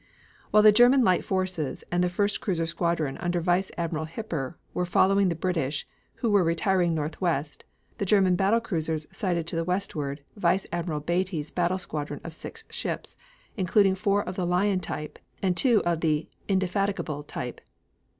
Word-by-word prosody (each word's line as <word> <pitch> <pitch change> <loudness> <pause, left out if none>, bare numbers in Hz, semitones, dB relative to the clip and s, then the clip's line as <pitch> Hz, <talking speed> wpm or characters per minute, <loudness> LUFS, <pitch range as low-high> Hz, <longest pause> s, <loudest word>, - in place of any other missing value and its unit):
While 210 0 +5
the 215 - +9
German 245 +4 +6
light 185 -5 +3
forces 185 -6 -2
and 175 +1 +2
the 180 - +2
first 200 +3 0
cruiser 170 -5 0
squadron 165 -4 -1
under 175 0 0
Vice 175 +2 +1
Admiral 160 -2 -2
Hipper 165 - -4 0.2
were 180 - 0
following 190 +2 +3
the 170 - -1
British, 160 -5 -1 0.3
who 230 - -1
were 200 -2 +5
retiring 175 0 +2
north 155 +3 -3
westward, 155 -5 -1 0.3
the 200 - 0
German 190 -2 +4
battle 200 +5 +3
cruisers 160 -8 -2
sighted 180 -4 -1
to 170 - -4
the 165 - 0
westward 150 -6 -2
Vice 185 -1 +1
Admiral 170 -3 -2
Beatty's 170 -1 -1
battle 175 +1 +1
squadron 150 -5 -4
of 165 - -7
six 450 - -8
ships, - - -4 0.4
including 195 +1 +3
four 200 +1 +1
of 180 - -6
the 180 -2 -1
Lion 185 +2 +2
type 150 -4 -5 0.2
and 185 -2 +2
two 235 0 +4
of 170 -2 0
the 155 -1 +1 0.2
Indefatigable 190 -5 0
type. 145 - -6
180 Hz, 170 wpm, -27 LUFS, 165-195 Hz, 0.4 s, the